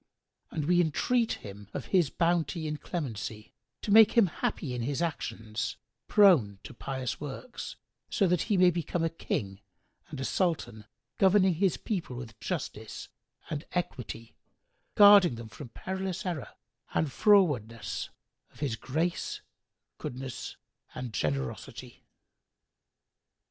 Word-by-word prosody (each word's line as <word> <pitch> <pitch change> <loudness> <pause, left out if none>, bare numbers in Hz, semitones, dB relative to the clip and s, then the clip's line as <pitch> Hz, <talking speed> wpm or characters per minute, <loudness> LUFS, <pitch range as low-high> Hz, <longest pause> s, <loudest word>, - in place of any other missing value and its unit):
And 155 - -3
we 175 +2 +4
entreat 230 - +1
him, 100 0 -9
of - - -3
His 175 -7 +4
bounty 170 -1 0
and 150 -1 -4
clemency, 110 - -5 0.3
to 205 - -2
make 220 0 +8
him 230 -4 +6
happy 155 -5 -2
in 125 - -3
his 140 +4 -1
actions, 115 -9 -3 0.3
prone 165 - +5
to - - -9
pious 130 +1 -4
works, 150 - -6 0.3
so 195 - +2
he 180 +4 +1
may 180 -1 +6
become 170 0 -2
a 165 - +1
King 95 -10 -3 0.5
and - - -7
a 135 - -2
Sultan 120 - -1 0.3
governing 190 -1 +5
his 185 +2 +1
people 180 - -3
with 115 -3 -8
justice - - -5 0.4
and 150 0 -3
equity, 125 -9 -4 0.6
guarding 200 - +8
them 115 -1 -8
from 125 +3 -10
perilous 190 +5 -4
error 170 -7 -3 0.5
and 155 -3 +1
frowardness, 145 - +2 0.4
of - - -19
His 140 -6 -1
grace, 160 +9 -2 0.6
goodness 130 +1 -6 0.4
and 125 -3 -5
generosity!" 70 -7 -3
155 Hz, 125 wpm, -29 LUFS, 120-180 Hz, 0.6 s, make